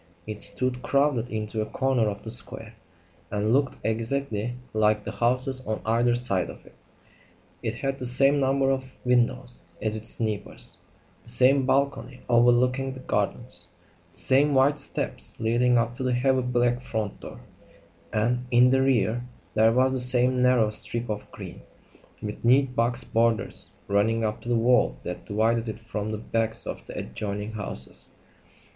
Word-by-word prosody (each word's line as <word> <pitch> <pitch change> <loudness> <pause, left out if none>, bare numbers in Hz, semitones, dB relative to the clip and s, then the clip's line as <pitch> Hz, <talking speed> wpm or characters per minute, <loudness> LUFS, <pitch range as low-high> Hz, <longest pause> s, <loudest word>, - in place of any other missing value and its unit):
It 105 -1 -6
stood, 125 -1 +1
crowded 140 -4 +1
into 110 0 -3
a - - -1
corner 125 -1 0
of 100 -1 -7
the 110 - -3
square, 115 -2 +2 0.6
and 105 +2 0
looked 140 0 +1
exactly 115 0 -2 0.2
like 105 -1 +2
the 105 - -5
houses 125 +4 0
on 110 0 -2
either 120 +2 +2
side 115 -7 0
of - - -12
it. - - -17 0.9
It - - -3
had 135 0 -3
the 125 - +4
same 135 +3 +3
number 135 0 +2
of 130 -1 -4
windows 125 0 +1 0.2
as 110 0 -2
its 110 +1 -3
neighbours; 105 -3 -3 0.4
the - - -8
same 130 +1 +4
balcony 135 -1 -1
overlooking 125 +2 +3
the 130 - -10
gardens; 105 -5 -2 0.4
the - - -19
same 140 +2 +3
white 140 +3 +3
steps 135 - -5
leading 120 +2 +2
up 115 +1 -1
to - - -4
the 130 -1 0
heavy 130 +1 +2
black 120 0 0
front 110 -4 -4
door; - - -10 0.7
and, 120 +3 0
in 125 +1 +5
the 130 0 +3
rear, 120 -3 +1 0.3
there 110 +1 +4
was 130 +2 +2
the 130 - -1
same 125 0 +4
narrow 125 -4 +3
strip 120 +2 -1
of 105 -1 -5
green, - - -10 0.6
with 105 0 -6
neat 125 +2 +3
box 120 0 +2
borders, 115 0 0 0.2
running 110 +3 +1
up 110 0 -3
to 120 - -7
the 120 - +2
wall 115 - +2
that - - -6
divided 115 +2 0
it 110 - -6
from 110 -1 -5
the 110 - -3
backs 115 0 +2
of - - -6
the - - -8
adjoining 105 - -5
houses. 105 - -3
120 Hz, 165 wpm, -25 LUFS, 110-130 Hz, 0.9 s, in